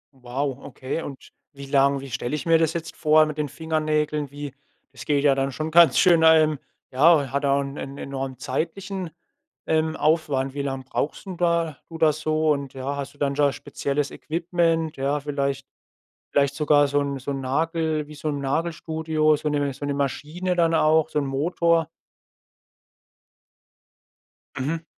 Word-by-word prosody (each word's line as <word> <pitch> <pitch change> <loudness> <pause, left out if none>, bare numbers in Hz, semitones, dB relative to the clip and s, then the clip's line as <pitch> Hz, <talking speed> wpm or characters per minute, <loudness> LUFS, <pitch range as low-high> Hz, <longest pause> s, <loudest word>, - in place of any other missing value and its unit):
Wow, 130 +1 -3
okay. 135 +3 -5
Und 140 -4 -9 0.2
wie 140 0 -9
lang 140 0 +3
wie 135 -1 -9
stelle 125 +3 -2
ich 150 - -5
mir 165 -1 +4
das 160 -1 +1
jetzt 165 -1 -5
vor 155 0 +4
mit 155 -1 -5
den 145 - -1
Fingernägeln? 155 -2 -1
Wie 145 0 -7 0.4
das 130 - -11
geht 145 -2 +1
ja 145 -2 +5
dann 135 0 -1
schon 155 +3 -4
ganz 170 0 +6
schön 170 -3 +5
ähm, 155 -2 +5 0.3
ja, 140 0 +4
hat 140 +1 -1
auch 140 0 +3
'n 140 0 -6
'n 140 +1 -7
enormen 135 -2 -5
zeitlichen, 175 +8 -3 0.6
ähm, 160 0 +1
Aufwand. 145 -4 +1
Wie 145 - -2
lange 135 -1 -3
brauchst 140 +7 -3
denn 185 -2 -7
da 170 -3 +1
oder 160 -2 +2
so? 155 +1 0
Und, 140 -2 -2
ja, 135 +2 -3
hast 140 0 -6
du - - -22
dann 140 -1 0
da 145 -1 +3
spezielles 140 0 -3
Equipment, 165 -1 -1
ja, 140 +2 0
vielleicht 140 -2 -2 0.7
vielleicht 140 -1 +2
sogar 145 -1 +4
so 145 +1 +1
'n 140 -1 -2
so 130 - -5
'n 135 - -4
Nagel 155 +2 -1
wie 150 - -10
so 150 +2 -4
'n 145 -1 -2
Nagelstudio, 160 +1 0
so 150 +1 -3
'ne 145 -1 0
so 145 - -8
'ne 140 - -1
Maschine 155 +6 -2
dann 165 -1 +3
auch, 160 0 +3
so 150 - 0
'n 140 - -2
Motor? 165 +4 +1 2.7
Mhm. 160 +5 -2
150 Hz, 175 wpm, -24 LUFS, 140-160 Hz, 2.7 s, ganz